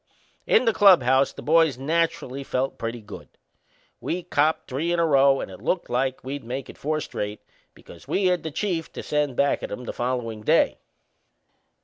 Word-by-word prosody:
In - - +4
the 225 - +3
clubhouse 135 -10 +5
the - - -11
boys 160 -3 +3
naturally 140 -2 -1
felt 130 0 -2
pretty 115 0 -4
good. 105 - -11 0.7
We'd 175 0 -4
copped 155 +1 +1
three 150 +6 -2
in 175 - +1
a 170 - +3
row 135 -2 +4
and - - -6
it 95 - -11
looked 180 -8 -2
like 130 +1 -1
we'd 135 +1 -5
make 125 +3 -5
it - - -21
four 155 +2 -1
straight, 105 -5 -5 0.4
because - - -15
we 195 - 0
had 180 -2 +2
the 160 - -4
Chief 165 0 -3
to - - -6
send 150 -3 -1
back 140 +2 +1
at - - -6
'em 125 - -6
the - - -5
followin' 120 -3 -3
day. - - +2
140 Hz, 190 wpm, -24 LUFS, 125-165 Hz, 0.7 s, clubhouse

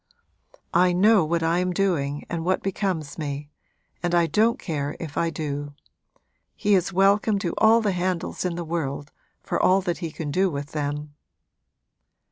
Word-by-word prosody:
I 180 0 +4
know 205 +2 +5
what 165 +1 0
I 165 +2 +2
am 180 0 0
doing 150 -7 0
and 165 -1 -3
what 185 +2 0
becomes 185 -6 -2
me, 145 -1 -5 0.5
and 175 0 0
I 170 -1 +4
don't 215 +9 +2
care 145 -4 -3
if 160 -3 -7
I 165 - +1
do. 145 -2 -4 0.8
He 210 -1 +1
is 190 0 +2
welcome 200 +3 +3
to 185 -4 -2
all 225 +1 +6
the 210 -2 +1
handles 180 -1 -2
in 180 -2 -1
the 170 0 -4
world, 150 -3 -3 0.3
for - - -1
all 185 +1 +5
that 175 -2 -2
he 170 -3 -3
can 150 -1 -5
do 190 +4 +2
with 145 -2 -5
them!' 150 0 -3
170 Hz, 170 wpm, -24 LUFS, 150-190 Hz, 0.8 s, all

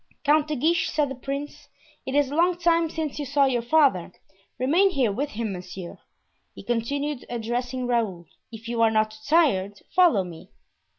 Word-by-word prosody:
"Count 300 +1 +3
de 305 - -2
Guiche," 325 +6 +1
said 300 -2 0
the - - -4
prince, 275 +3 -6 0.4
"it 265 - -2
is 285 -2 +2
a - - -3
long 345 +2 +3
time 335 -1 +2
since 310 -2 -4
you 290 - -3
saw 280 +1 +3
your 250 -3 +1
father, 240 - +2 0.5
remain 330 +10 +3
here 260 - +1
with 275 +8 -2
him. 215 -2 -4
Monsieur," 180 0 -8 0.6
he - - -10
continued, 280 +4 -2
addressing 245 +2 -3
Raoul, 220 -8 -1 0.3
"if 225 0 -10
you 235 -1 -1
are 225 - +5
not 215 0 +1
too 215 - -13
tired, 205 - +2 0.2
follow 345 - +5
me." 170 -3 -11
260 Hz, 180 wpm, -25 LUFS, 225-300 Hz, 0.6 s, are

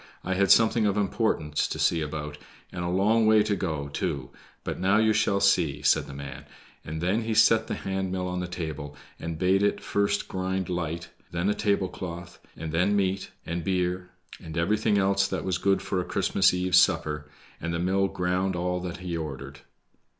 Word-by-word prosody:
I 95 - -1
had 100 0 +2
something 110 +2 +5
of 100 0 0
importance 95 -7 0
to - - -4
see 85 - +2
about, 75 -1 -5 0.3
and 90 - -4
a - - -2
long 110 +5 +3
way 110 -1 +6
to 105 -1 0
go, 80 -7 -3
too; 70 -2 -3 0.3
but - - -4
now 95 +3 +3
you 110 0 +4
shall 105 -2 +2
just 100 0 +5
see!" 75 -4 -2
said - - +3
the 70 - -9
man, 70 0 -8 0.4
and 80 +1 -5
then 95 +6 +1
he 110 -1 -2
set 110 +1 +5
the - - -2
hand 95 -1 -3
mill 90 -1 -2
on 90 0 -3
the 90 - -3
table 80 -4 -5 0.2
and 80 -1 -4
bade 95 +3 +3
it 100 - +1
first 100 0 0
grind 95 -1 -2
light, 85 -1 -3 0.2
then 85 +3 -1
a - - +2
tablecloth, 90 -4 -3 0.2
and 80 -1 -5
then 90 +5 +2
meat, 95 -1 0 0.2
and 85 0 -3
beer, 90 0 -1 0.3
and 80 0 -7
everything 105 +4 +2
else 100 0 +2
that - - -3
was 90 -2 0
good 95 0 +2
for 95 - -1
a - - -3
Christmas 95 - +2
eve's 90 0 +4
supper; 75 -1 +1 0.3
and 85 - -2
the 85 - -1
mill 95 +3 +1
ground 90 +1 -1
all 90 +1 -1
that 90 -1 -5
he 85 -1 -2
ordered. 70 -3 -6
90 Hz, 200 wpm, -27 LUFS, 85-100 Hz, 0.4 s, way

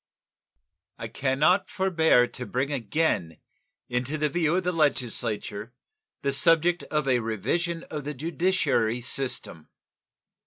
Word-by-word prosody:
I 115 - -6
can 130 +2 -1
not 180 +7 +3
forbear 160 -9 +3
to 125 +1 -7
bring 135 +3 -2
again 115 - -1 0.5
into 125 +5 -2
the 150 0 0
view 165 +1 +1
of 185 - 0
the 180 - 0
Legislature 120 - -1 0.5
the 140 - +1
subject 165 +4 +3
of 150 -2 -1
a 125 -2 +3
revision 135 - -2
of 150 -2 -4
the 150 0 -4
judiciary 160 -7 0
system. 120 - 0
140 Hz, 125 wpm, -26 LUFS, 120-165 Hz, 0.5 s, not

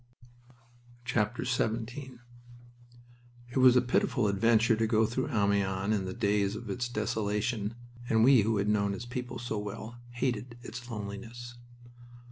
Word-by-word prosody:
XVII 120 +3 -1 1.4
It - - -3
was 130 -1 +7
a 125 - +5
pitiful 125 -2 +1
adventure 115 +3 +3
to 110 0 +1
go 110 0 +3
through 120 +4 -2
Amiens 100 -1 +1
in 100 -3 0
the 95 - -4
days 100 0 +1
of 110 -1 -6
its 120 +4 -2
desolation, 105 0 -1 0.3
and 110 0 +4
we 130 -1 +7
who 110 +1 +1
had 100 +1 0
known 100 -1 +1
its 120 - -7
people 125 +1 -5
so 115 -3 -3
well 110 +3 -7
hated 120 -1 -2
its 120 0 -8
loneliness. 115 +3 -7
110 Hz, 135 wpm, -30 LUFS, 105-120 Hz, 1.4 s, was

